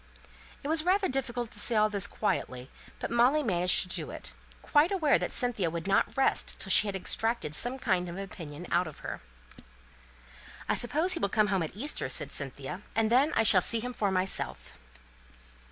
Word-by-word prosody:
It - - -4
was 315 0 +3
rather 380 +3 +2
difficult 245 -3 -3
to 210 - -6
say 230 - +1
all 215 0 +4
this 200 -2 0
quietly, 135 - -3 0.3
but - - -5
Molly 250 +6 +3
managed 180 -5 +3
to - - -10
do 185 - -2
it, - - -7 0.3
quite 300 +4 +3
aware 320 -7 +2
that - - -3
Cynthia 230 -9 +1
would 170 +1 -5
not 195 +6 +1
rest 270 - +1
till - - -2
she 215 - +7
had 200 - -3
extracted 205 -2 -1
some 245 +10 +3
kind 185 -8 -1
of 170 - -7
an 195 - -4
opinion 165 -4 -9
out 175 0 +2
of 155 - -11
her. - - -6 1.5
"I - - +1
suppose 315 +9 +2
he 335 - -2
will 200 - 0
come 210 0 +1
home 190 - +1
at 160 +2 -5
Easter," 285 +9 -3
said - - -1
Cynthia, - - -5
"and 225 0 +1
then 270 +6 +4
I 225 - +3
shall 195 -4 +5
see 230 +5 0
him 250 +2 -5
for 205 -4 -1
myself." 190 0 -3
215 Hz, 200 wpm, -29 LUFS, 185-260 Hz, 1.5 s, she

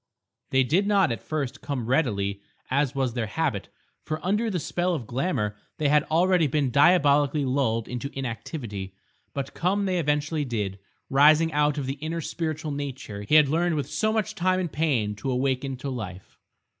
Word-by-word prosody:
They 130 0 +3
did 175 +11 +2
not 195 - +3
at 115 -4 -3
first 140 -3 -3
come 140 -5 -3
readily 100 -7 0 0.3
as 140 0 +1
was 130 -3 0
their 120 -3 -2
habit, 140 -4 -2 0.3
for 155 0 -3
under 210 +5 +1
the 185 -4 -1
spell 175 +3 -1
of 130 -7 -5
glamour 120 - -1 0.2
they 150 -2 +1
had 150 0 +4
already 175 0 +3
been 140 -2 0
diabolically 145 -1 +4
lulled 125 -4 0
into 125 +3 -4
inactivity, 115 - -5 0.4
but 140 -1 -4
come 195 +4 0
they 185 -2 +1
eventually 150 0 0
did, 105 -7 -3 0.3
rising 155 +3 +5
out 150 0 +2
of 140 - -2
the 135 +2 -4
inner 160 +2 -3
spiritual 160 -1 -3
nature 135 -7 -5
he 105 +9 +1
had 150 -2 +7
learned 165 +3 +1
with 145 - -3
so 215 0 +1
much 215 -1 -1
time 185 -2 +1
and 175 -4 -2
pain 130 -10 0
to 105 - -4
awaken 130 +1 -1
to 135 +2 -5
life. 100 -7 -7
145 Hz, 180 wpm, -26 LUFS, 125-160 Hz, 0.4 s, had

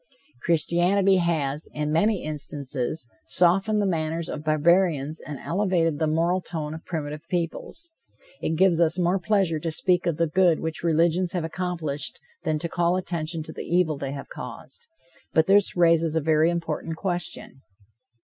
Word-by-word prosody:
Christianity 175 +4 +3
has, 155 -4 -1
in 150 0 -2
many 200 +5 +2
instances, 145 -2 -3 0.2
softened 195 +5 +3
the 205 - +1
manners 165 -2 -1
of 150 - -5
barbarians 155 -1 +2
and 150 -2 -7
elevated 170 -4 0
the 160 - +1
moral 170 +4 +1
tone 155 -4 -4
of 160 - -8
primitive 155 -1 -5
peoples. 180 - -3 0.5
It 160 - -1
gives 175 -1 +4
us 170 +1 +3
more 180 +2 +2
pleasure 185 -4 +1
to 165 - -3
speak 175 +2 +1
of 165 -3 0
the 170 - +2
good 170 0 +3
which 160 0 -4
religions 170 +2 +2
have 175 -3 -1
accomplished 165 -4 -3 0.2
than 155 - 0
to 170 - -3
call 175 +1 +1
attention 165 -3 -3
to 160 - -9
the - - -6
evil 170 -2 +1
they 140 -1 -4
have 135 - -7
caused. 470 - -9 0.5
But 160 - +4
this 195 0 +4
raises 165 -2 +3
a - - +3
very 155 +2 +3
important 165 -1 -3
question. 175 -7 -4
165 Hz, 160 wpm, -25 LUFS, 155-180 Hz, 0.5 s, gives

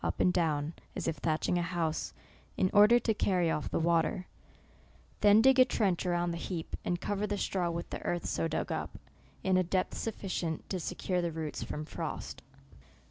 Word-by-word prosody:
up - - -2
and 180 - +4
down, 155 -3 0 0.2
as - - -3
if 165 - -1
thatching 165 +2 0
a - - +1
house, 170 -2 -2 0.5
in 185 - +2
order 210 +3 +7
to 230 -2 +1
carry 180 -5 +1
off 150 - -2
the - - -1
water; 170 +3 +1 0.9
then 210 +1 +6
dig 265 0 +6
a - - +10
trench 200 -9 0
a - - +1
round 175 0 0
the 170 - -4
heap, 170 -2 -4
and 175 -1 -1
cover 205 +2 -1
the 205 0 -2
straw 180 -3 0
with 170 0 -4
the - - -4
earth 175 -1 -2
so 165 - 0
dug - - -2
up, - - -4 0.5
in 190 -1 +3
a 185 - +3
depth 185 +1 -1
sufficient 185 -7 -3
to 185 - -2
se~ 175 - -4
cure 180 0 -1
the 170 -1 -1
roots 155 -1 -4
from 150 0 -4
frost. - - -5
175 Hz, 200 wpm, -31 LUFS, 165-195 Hz, 0.9 s, a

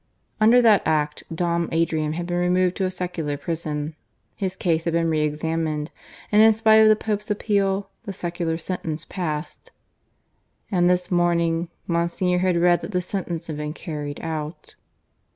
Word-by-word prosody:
Under 235 +3 +6
that 215 -4 +6
Act 150 -1 0
Dom 170 0 0
Adrian 160 -2 0
had 170 +2 -3
been 175 0 -2
removed 180 0 +2
to 190 - 0
a - - 0
secular 175 -5 -3
prison, 155 -1 -3 0.4
his 190 -2 -3
case 165 -3 0
had 170 - 0
been 165 -1 +1
re 155 -1 +1
examined 155 0 -2 0.4
and, 210 0 +6
in 220 0 +7
spite 220 0 +5
of 220 - +7
the 215 - +6
Pope's 210 -1 -3
appeal, 200 -2 0
the 200 - -4
secular 175 -3 -3
sentence 165 -2 -3
passed. 155 -5 -5 1.0
And 175 -2 +3
this 180 0 +1
morning 170 -1 +1 0.2
Monsignor 170 +1 0
had 180 -1 +2
read 175 0 +4
that 210 - -7
the 180 - +1
sentence 175 -3 -4
had 155 -2 -5
been 150 0 -4
carried 150 -4 -6
out. 160 0 -5
170 Hz, 165 wpm, -23 LUFS, 160-185 Hz, 1.0 s, in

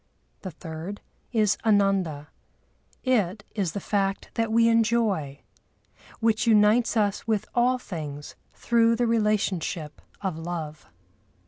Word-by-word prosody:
The 190 - -5
third 165 +4 -7 0.3
is 215 -4 +2
Ananda: 195 -8 +1 0.7
it 210 -6 +1
is 190 -6 -2
the - - -3
fact 195 0 -1
that 225 -1 -1
we 230 +1 +4
enjoy, 220 -11 +1 0.8
which 225 0 +1
unites 220 +2 +4
us 205 0 0
with 215 -3 0
all 250 +1 +3
things 150 - -7 0.2
through 230 -1 +3
the 240 +1 +1
relationship 205 -8 -1 0.2
of 185 -5 -3
love. 160 -2 -6
205 Hz, 115 wpm, -26 LUFS, 170-230 Hz, 0.8 s, we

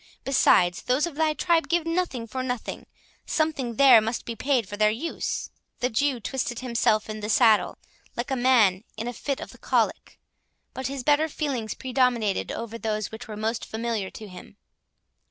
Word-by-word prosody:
Besides, 180 -9 +3
those 255 +5 +1
of 340 - -6
thy 310 +1 +1
tribe 335 -1 +2
give 345 -1 +1
nothing 330 -8 -1
for 255 +3 -4
nothing; 250 -2 -4 0.4
something 295 -7 -1
there 260 -3 +7
must 225 +2 -3
be 230 - -5
paid 255 -3 0
for 205 - -6
their 210 0 +4
use." 260 +10 -3 0.3
The 250 - 0
Jew 270 +2 +1
twisted 240 +1 -3
himself 235 -4 +1
in 215 0 -5
the 210 0 -5
saddle, 220 -1 +4 0.4
like 240 +3 -3
a - - +2
man 235 -7 +4
in 225 - -4
a 245 - -3
fit 275 +3 -3
of - - -8
the - - -16
colic; - - -1 0.5
but 260 0 -4
his 270 -1 -5
better 300 +3 +3
feelings 265 -8 -3
predominated 250 -5 0
over 230 0 -6
those 215 -2 -2
which 220 +2 -9
were 215 -1 -7
most 220 +2 -2
familiar 220 -3 -3
to 215 - -10
him. 180 -2 -12
245 Hz, 180 wpm, -25 LUFS, 220-275 Hz, 0.5 s, there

